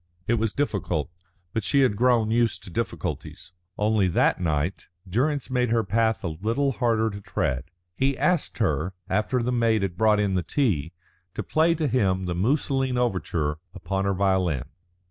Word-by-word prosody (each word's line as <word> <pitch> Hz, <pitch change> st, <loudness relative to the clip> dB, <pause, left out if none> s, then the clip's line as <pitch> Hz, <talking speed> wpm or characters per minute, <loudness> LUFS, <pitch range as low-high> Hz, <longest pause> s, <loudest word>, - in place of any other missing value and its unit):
It 115 Hz, 0 st, +1 dB
was 110 Hz, -1 st, 0 dB
difficult, 95 Hz, -, -1 dB, 0.4 s
but 110 Hz, -, -1 dB
she 140 Hz, +6 st, +3 dB
had 125 Hz, -6 st, +3 dB
grown 115 Hz, -1 st, +3 dB
used 115 Hz, -1 st, +1 dB
to 90 Hz, -, -10 dB
difficulties. 85 Hz, -, -4 dB, 0.2 s
Only 105 Hz, -2 st, +2 dB
that 90 Hz, -, +2 dB
night 80 Hz, +2 st, -1 dB, 0.2 s
Durrance 130 Hz, +8 st, 0 dB
made 125 Hz, -2 st, +1 dB
her 115 Hz, 0 st, +2 dB
path 110 Hz, -1 st, +1 dB
a 85 Hz, -, -1 dB
little 120 Hz, +6 st, +1 dB
harder 110 Hz, -1 st, +1 dB
to 100 Hz, +1 st, -8 dB
tread. 65 Hz, -8 st, -2 dB, 0.3 s
He 135 Hz, 0 st, +1 dB
asked 175 Hz, -4 st, +1 dB
her, 90 Hz, +4 st, 0 dB
after 110 Hz, +6 st, 0 dB
the 125 Hz, -, 0 dB
maid 115 Hz, -4 st, +2 dB
had 90 Hz, -2 st, -3 dB
brought 110 Hz, -1 st, +4 dB
in 100 Hz, -2 st, +1 dB
the 90 Hz, -, +1 dB
tea, 85 Hz, -, 0 dB, 0.4 s
to -, -, -3 dB
play 165 Hz, +2 st, +2 dB
to 155 Hz, -2 st, 0 dB
him 95 Hz, -7 st, +1 dB
the 90 Hz, -, -2 dB
Musoline 130 Hz, -, +1 dB
Overture 85 Hz, -10 st, -1 dB, 0.2 s
upon 95 Hz, +2 st, -2 dB
her 100 Hz, -1 st, +1 dB
violin. 95 Hz, -7 st, +1 dB
110 Hz, 170 wpm, -25 LUFS, 95-125 Hz, 0.4 s, brought